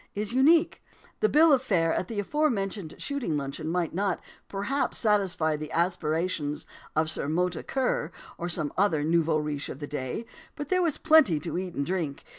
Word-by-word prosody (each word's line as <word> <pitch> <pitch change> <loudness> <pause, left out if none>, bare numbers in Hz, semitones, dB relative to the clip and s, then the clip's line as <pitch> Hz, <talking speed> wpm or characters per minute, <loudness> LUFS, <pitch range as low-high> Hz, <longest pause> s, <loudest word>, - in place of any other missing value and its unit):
is 210 +2 -2
unique. 310 +6 +4 0.4
The 435 - +3
bill 310 0 +6
of 265 - +4
fare 170 -9 +1
at 180 - -1
the 220 -3 -4
aforementioned 205 - -1
shooting 260 - -2
luncheon 140 +2 -4
might 170 0 -1
not, 195 0 0 0.3
perhaps, 205 +9 -1
satisfy 195 -8 +2
the 150 0 -6
aspirations 165 -3 -1 0.3
of 155 +1 +2
Sir 155 - -1
Mota 175 +2 0
Kerr, 255 - -1 0.2
or 175 - -4
some 155 -4 -2
other 180 -7 +2
nouveau 165 0 +2
riche 150 -2 -3
of - - -6
to 145 - -5
day, 145 - -4 0.3
but 290 -1 -6
there 365 0 +3
was 330 -5 +1
plenty 310 - +5
to 165 - -4
eat 180 -1 -4
and 140 - -1
drink. 165 -6 -3
180 Hz, 180 wpm, -27 LUFS, 155-230 Hz, 0.4 s, bill